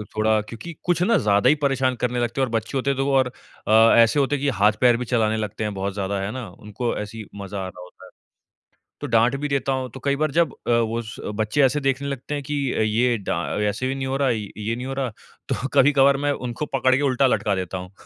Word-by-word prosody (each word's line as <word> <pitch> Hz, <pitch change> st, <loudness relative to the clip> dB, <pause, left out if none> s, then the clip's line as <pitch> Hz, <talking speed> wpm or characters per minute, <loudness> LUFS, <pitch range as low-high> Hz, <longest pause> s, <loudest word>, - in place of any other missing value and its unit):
थोड़ा 110 Hz, 0 st, +2 dB
क्योंकि 115 Hz, +10 st, -9 dB
कुछ 175 Hz, -1 st, +1 dB
ना 225 Hz, +6 st, +3 dB
ज़्यादा 105 Hz, +3 st, +3 dB
ही 150 Hz, -, +5 dB
परेशान 135 Hz, -3 st, 0 dB
करने 125 Hz, 0 st, -1 dB
लगते 120 Hz, +3 st, -1 dB
हैं -, -, +4 dB
और -, -, -9 dB
बच्चे 115 Hz, +4 st, -2 dB
होते 135 Hz, +1 st, -1 dB
हैं 135 Hz, -, 0 dB
तो 135 Hz, -, 0 dB
वो 140 Hz, -, 0 dB
और 130 Hz, -, +3 dB, 0.4 s
अ, 110 Hz, +1 st, +6 dB
ऐसे 115 Hz, +5 st, +5 dB
होते 140 Hz, +1 st, +1 dB
है 140 Hz, -, -5 dB
कि 145 Hz, -, +1 dB
हाथ-पैर 110 Hz, +2 st, +3 dB
भी 125 Hz, -, -4 dB
चलाने 110 Hz, -2 st, +1 dB
लगते 105 Hz, 0 st, -4 dB
है 105 Hz, -, -1 dB
बहुत 100 Hz, -1 st, -3 dB
ज़्यादा 100 Hz, 0 st, -2 dB
है 100 Hz, +2 st, -3 dB
ना? 125 Hz, -3 st, -6 dB
उनको 105 Hz, +6 st, -4 dB
ऐसे 105 Hz, +2 st, -6 dB
ही 110 Hz, -, -7 dB
मज़ा 100 Hz, 0 st, -6 dB
आ 95 Hz, -1 st, -3 dB
रहा 90 Hz, -, -11 dB
होता 90 Hz, +1 st, -15 dB
है। -, -, -14 dB, 0.9 s
तो 145 Hz, -, -3 dB
डाँट 115 Hz, +2 st, +3 dB
भी 145 Hz, -, -1 dB
देता 140 Hz, -1 st, -1 dB
हूँ 130 Hz, -1 st, -2 dB
तो 130 Hz, -, -8 dB
कई 140 Hz, 0 st, +1 dB
बार 155 Hz, 0 st, 0 dB
जब 165 Hz, -2 st, +2 dB
अ, -, -, +2 dB
वो 115 Hz, 0 st, +1 dB
स 110 Hz, -1 st, -9 dB, 0.2 s
बच्चे 110 Hz, +7 st, 0 dB
ऐसे 135 Hz, +3 st, +3 dB
देखने 135 Hz, 0 st, -1 dB
लगते 140 Hz, +1 st, -4 dB
है 145 Hz, -, -3 dB
कि 150 Hz, +2 st, -6 dB, 0.4 s
ये 120 Hz, +2 st, +2 dB
डा 100 Hz, -, -3 dB, 0.3 s
ऐसे 115 Hz, +6 st, -3 dB
भी 135 Hz, -, -2 dB
नहीं 135 Hz, -1 st, -3 dB
हो 135 Hz, -, -1 dB
रहा 140 Hz, -2 st, +2 dB
ये 110 Hz, 0 st, -3 dB
नहीं 125 Hz, +2 st, -6 dB
हो 135 Hz, -, -4 dB
रहा 135 Hz, -2 st, -2 dB, 0.4 s
तो 130 Hz, -, -1 dB
कभी-कभार 140 Hz, 0 st, +5 dB
मैं 145 Hz, +1 st, 0 dB, 0.2 s
उनको 120 Hz, +5 st, -4 dB
पकड़ 130 Hz, -2 st, +2 dB
के 135 Hz, -, 0 dB
उल्टा 135 Hz, -1 st, +3 dB
लटका 105 Hz, -5 st, +1 dB
देता 95 Hz, 0 st, -4 dB
हूँ। 90 Hz, +1 st, -8 dB
125 Hz, 260 wpm, -23 LUFS, 110-135 Hz, 0.9 s, अ